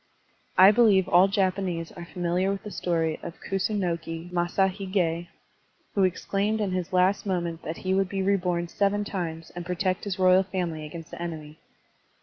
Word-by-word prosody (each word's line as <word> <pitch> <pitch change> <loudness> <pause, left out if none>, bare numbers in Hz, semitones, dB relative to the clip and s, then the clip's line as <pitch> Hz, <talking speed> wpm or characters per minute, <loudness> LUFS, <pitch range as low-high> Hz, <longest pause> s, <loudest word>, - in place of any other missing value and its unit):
I 190 +2 +9
believe 210 -5 +4
all 180 +2 +6
Japanese 185 -4 -1
are 175 -2 -9
familiar 180 +2 0
with 195 - -4
the 210 - -7
story 165 -4 -1
of 170 - -8
Kusunoki 175 -4 -2
Masashig6, 180 -1 0 0.7
who 200 - +2
exclaimed 200 +4 -1
in 205 -3 -1
his 185 -2 -2
last 185 +3 +2
moment 170 -3 -2
that 160 - -5
he 185 - +2
would 190 -1 +1
be 195 0 -2
reborn 180 -3 +1
seven 205 +3 0
times 165 -5 -5
and 175 - -5
protect 180 +2 -1
his 200 -2 -3
royal 185 0 +5
family 175 -5 -3
against 165 +1 -9
the - - -8
enemy. 155 -2 -6
185 Hz, 160 wpm, -26 LUFS, 170-195 Hz, 0.7 s, I